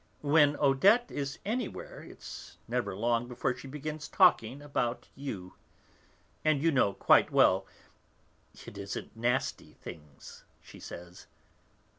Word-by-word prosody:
When 145 0 +5
Odette 190 - +4
is 140 +1 -4
anywhere 230 +1 -4
it's - - -11
never - - -2
long 120 +3 0
before 125 0 -2
she 130 - -10
begins 150 +2 -6
talking 140 - +4
about 140 -4 -2
you. 105 -10 -7 0.9
And 155 -2 +3
you 165 +3 +2
know 125 -8 +3
quite - - +4
well, - - +4 1.0
it 100 - -10
isn't 100 +3 -6
nasty 120 +3 -1
things 75 -2 -12 0.2
she - - -14
says. 85 +1 -10
135 Hz, 120 wpm, -30 LUFS, 115-150 Hz, 1.0 s, When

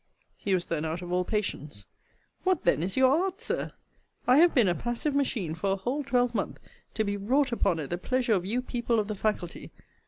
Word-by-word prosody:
He 195 -2 0
was 175 - -1
then 160 -2 -2
out 160 +2 -3
of 175 - -6
all 180 0 +2
patience: 155 - -3 0.6
What, 370 -3 +1
then, - - +3
is 185 +6 -2
your 260 0 +6
art, 385 +1 -3
Sir? 465 - -3 0.5
I 250 +2 +5
have 340 +2 +6
been 240 -6 +5
a 175 - +3
passive 240 - -2
machine 245 - 0
for 195 +4 0
a - - +1
whole 250 +9 -2
twelvemonth, 245 -2 0 0.4
to 220 - +1
be 205 -1 -2
wrought 255 +7 +1
upon 195 -7 +1
at 150 -1 -5
the 175 - -1
pleasure 250 +3 +1
of 185 -4 +1
you 235 +7 -1
people 235 -2 0
of 210 - -1
the 215 - -2
faculty. 200 -4 -3
215 Hz, 215 wpm, -28 LUFS, 180-255 Hz, 0.6 s, your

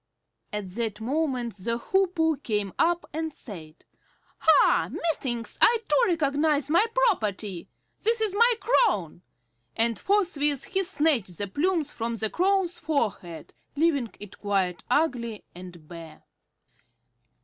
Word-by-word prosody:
At 210 -2 -4
that 220 0 -3
moment 250 -3 -2
the 230 +5 -2
Hoopoe 330 +1 +1
came 210 -6 -2
up 345 +1 +2
and 320 +1 -3
said, 165 - -12 0.5
"Ha! 320 - +4
Methinks 255 -8 -2
I 470 - +6
too - - +2
recognize 295 -3 +1
my 350 +8 +4 0.2
property. 210 - -2 0.3
This 455 +2 +2
is 435 -3 0
my 470 +4 +5
crown," 200 - +1 0.5
and 230 0 0
forthwith 295 -9 +1
he 385 0 0
snatched 290 - +1
the 205 - -2
plumes 310 - -1
from 230 0 -3
the 220 -1 -2
Crow's 375 -1 +1
forehead, 220 - -3 0.2
leaving 285 -6 +1
it 205 -2 -11
quite 195 -3 -1
ugly 240 -8 0
and 175 -3 -12
bare. 165 -2 -11
275 Hz, 125 wpm, -26 LUFS, 205-335 Hz, 0.5 s, I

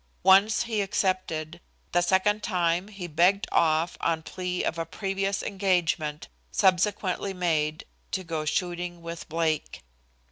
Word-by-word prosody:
Once 195 +4 +5
he 225 -3 -1
accepted. 185 -4 -1 0.3
The 175 - +3
second 195 +4 +2
time 175 -2 0
he 200 -4 -7
begged 175 +5 +3
off 160 +1 +2
on 160 -1 0
plea 180 0 -3
of 165 - -2
a 165 - -1
previous 195 +1 -2
engagement, 175 -6 0 0.2
subsequently 190 0 +1
made, 155 -3 0 0.2
to 190 - -2
go 165 -3 -3
shooting 175 +2 -2
with 170 0 -7
Blake. 160 - -1
180 Hz, 130 wpm, -27 LUFS, 165-195 Hz, 0.3 s, Once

